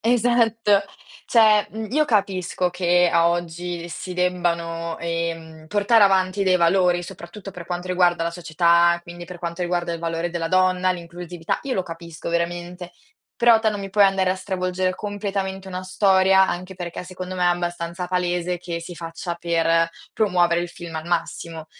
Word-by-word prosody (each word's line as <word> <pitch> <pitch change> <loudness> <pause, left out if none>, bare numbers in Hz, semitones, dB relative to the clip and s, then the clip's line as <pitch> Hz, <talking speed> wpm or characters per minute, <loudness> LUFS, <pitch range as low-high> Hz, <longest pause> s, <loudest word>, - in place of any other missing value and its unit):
esatto. 230 -3 +3 0.4
Cioè, 215 -3 +5
mhmm, 220 +1 -6
io 305 +1 +3
capisco 190 - 0
che, 175 0 +3
a 170 0 +4
oggi, 175 0 -3
si 180 +2 -6
debbano, 170 -2 -1
ehm, 165 -1 -4
portare 210 +3 +4
avanti 190 0 +3
dei 185 -1 +4
valori, 175 0 +3
soprattutto 190 +2 -10
per 175 -1 -9
quanto 175 +1 -4
riguarda 175 -2 +2
la 170 - -2
società, 170 0 +3
quindi 175 0 -9
per 180 0 -9
quanto 170 +1 -4
riguarda 175 -1 -1
il 165 - -5
valore 165 0 -2
della 165 -1 -3
donna, 185 0 +3
l'inclusività, 175 -1 -4
io 270 -2 -2
lo 185 - -1
capisco 165 -1 -7
veramente, 175 +1 -3 0.5
però 235 -1 +6
te 220 -1 +1
non 205 - -4
mi 195 - -6
puoi 205 +1 +5
andare 195 -1 +2
a - - +1
stravolgere 185 -1 -1
completamente 195 -2 -4
una 185 0 -5
storia, 190 0 +4
anche 185 +2 -4
perché, 175 -1 -6
secondo 185 0 -7
me, 180 - -2
è - - +4
abbastanza 175 0 -2
palese 180 -1 -1
che 170 -1 -5
si 175 +1 -8
faccia 170 +1 -5
per 165 -1 +2 0.2
promuovere 175 -5 +2
il 175 - -3
film 170 -1 -9
al 160 +1 -5
massimo. 165 -2 -3
180 Hz, 170 wpm, -23 LUFS, 170-190 Hz, 0.5 s, però